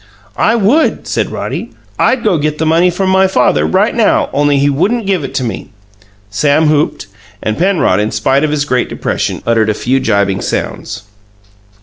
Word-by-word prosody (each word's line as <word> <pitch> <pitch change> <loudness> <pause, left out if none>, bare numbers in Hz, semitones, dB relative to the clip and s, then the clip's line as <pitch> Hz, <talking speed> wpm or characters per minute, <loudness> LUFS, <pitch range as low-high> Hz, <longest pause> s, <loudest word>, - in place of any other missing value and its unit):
"I 225 - +3
would," 235 +9 +1
said - - -2
Roddy. - - -5 0.3
"I'd 255 -2 +2
go 185 -7 +1
get 150 +1 -1
the 160 - -1
money 165 +3 +3
from 190 +2 -1
my 190 0 +4
father 125 - +1
right - - +1
now, - - +1
only 145 0 +2
he 140 +1 +2
wouldn't 195 - 0
give 190 -5 0
it 135 0 -7
to 135 - 0
me." 115 - -5 0.6
Sam 150 +7 +2
whooped, 150 -7 0 0.4
and 110 - -1
Penrod, 175 - +1
in 105 +1 0
spite 130 +7 +1
of 155 - +1
his 145 -1 -1
great 125 -4 0
depression, - - -3
uttered 115 -2 +2
a 105 - 0
few 130 +5 0
jibing 100 -5 0
sounds. 100 - -4
145 Hz, 185 wpm, -13 LUFS, 115-180 Hz, 0.6 s, my